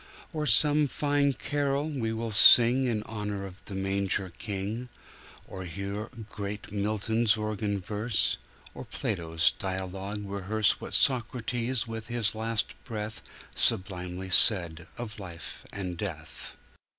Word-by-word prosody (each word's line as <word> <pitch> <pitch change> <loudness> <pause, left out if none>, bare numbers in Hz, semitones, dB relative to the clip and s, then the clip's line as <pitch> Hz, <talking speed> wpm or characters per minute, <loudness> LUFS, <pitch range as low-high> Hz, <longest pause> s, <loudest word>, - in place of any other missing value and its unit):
Or 150 -1 -2
some 150 0 +5
fine 145 0 +1
carol 145 +1 -2
we 130 -8 -3
will 115 0 -4
sing 120 +5 +9
In 110 -4 -1
honor 105 -3 -5
of 95 0 -12
the 100 - -8
Manger 95 -1 -1
King 105 +4 -4 0.6
Or 95 -1 -8
hear 100 +5 -5 0.2
great 105 -1 -7
Milton's 110 +2 0
organ 105 -1 -2
verse 105 +4 0 0.3
Or - - -8
Plato's 80 -4 0
dialogue 95 +2 -4
rehearse 100 +2 0
What - - 0
Socrates 120 -1 0
with 115 -1 -7
his 120 -3 0
last 110 0 -2
breathSublimely 95 -4 -3
said 85 -5 +4
of 115 -2 -7
life 85 -4 -9
and 90 -3 -5
death. 80 -5 -6
105 Hz, 120 wpm, -28 LUFS, 95-115 Hz, 0.6 s, sing